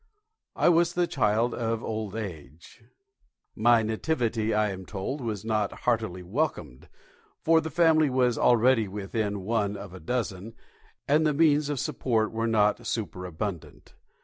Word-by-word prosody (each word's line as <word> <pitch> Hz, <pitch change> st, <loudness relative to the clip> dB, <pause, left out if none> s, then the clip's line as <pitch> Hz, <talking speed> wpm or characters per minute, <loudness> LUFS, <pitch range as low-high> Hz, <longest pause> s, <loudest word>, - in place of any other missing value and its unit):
I -, -, +2 dB
was 170 Hz, 0 st, +4 dB
the 175 Hz, 0 st, +1 dB
child 115 Hz, -5 st, +1 dB
of 115 Hz, -1 st, -2 dB
old 110 Hz, -2 st, -4 dB
age. 85 Hz, -, -8 dB, 0.7 s
My 115 Hz, +1 st, +4 dB
nativity, 115 Hz, -1 st, -1 dB
I 105 Hz, -1 st, +1 dB
am 95 Hz, 0 st, -7 dB
told, 105 Hz, +9 st, -5 dB
was 110 Hz, -4 st, -4 dB
not 110 Hz, -2 st, -1 dB
heartily 110 Hz, -7 st, 0 dB
welcomed, 90 Hz, -, -3 dB, 0.5 s
for 165 Hz, 0 st, +4 dB
the 160 Hz, -, -5 dB
family 160 Hz, -1 st, +4 dB
was 125 Hz, -2 st, +2 dB
already 120 Hz, -1 st, +3 dB
within 100 Hz, +1 st, -3 dB
one 105 Hz, 0 st, -1 dB
of 100 Hz, -2 st, -9 dB
a 95 Hz, -, -9 dB
dozen, 110 Hz, +1 st, -4 dB, 0.5 s
and 150 Hz, +3 st, +3 dB
the 150 Hz, -2 st, +1 dB
means 150 Hz, -1 st, +3 dB
of 145 Hz, -3 st, -2 dB
support 120 Hz, -7 st, 0 dB
were 115 Hz, +1 st, -1 dB
not 110 Hz, +1 st, +1 dB
superabundant. 90 Hz, -3 st, -5 dB
110 Hz, 145 wpm, -27 LUFS, 100-130 Hz, 0.7 s, was